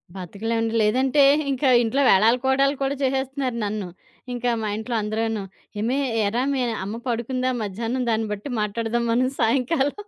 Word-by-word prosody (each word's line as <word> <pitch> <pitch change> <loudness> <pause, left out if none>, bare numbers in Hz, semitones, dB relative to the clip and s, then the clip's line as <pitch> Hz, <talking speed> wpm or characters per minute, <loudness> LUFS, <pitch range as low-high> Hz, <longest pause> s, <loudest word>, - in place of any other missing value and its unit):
బతకలేమండి. 225 +5 -3
లేదంటే 260 +6 +3 0.3
ఇంకా 265 0 +1
ఇంట్లో 250 +5 0
వేలాలు 220 +6 +5
కోలాళ్లు 275 +1 +2
కూడా 275 +1 0
చేసేస్తున్నారు 265 -1 -1
నన్ను. 205 -2 -3 0.5
ఇంకా 245 0 -1
మా 215 - -2
ఇంట్లో 230 +2 -4
అందరూను, 220 0 -2 0.4
"ఏమే! 250 +6 0 0.2
ఏరా, 225 +5 0
మీ 265 - 0 0.2
అమ్మ 210 +3 -4
పడుకుందా 255 +2 -1
మధ్యాహ్నం? 230 +5 -3
దాన్ని 220 0 0
బట్టి 210 +7 -7
మాట్లాడదాం 230 +3 -1
మనం 255 +2 +2
సాయంకాలం." 270 +4 +1
235 Hz, 145 wpm, -23 LUFS, 220-265 Hz, 0.5 s, వేలాలు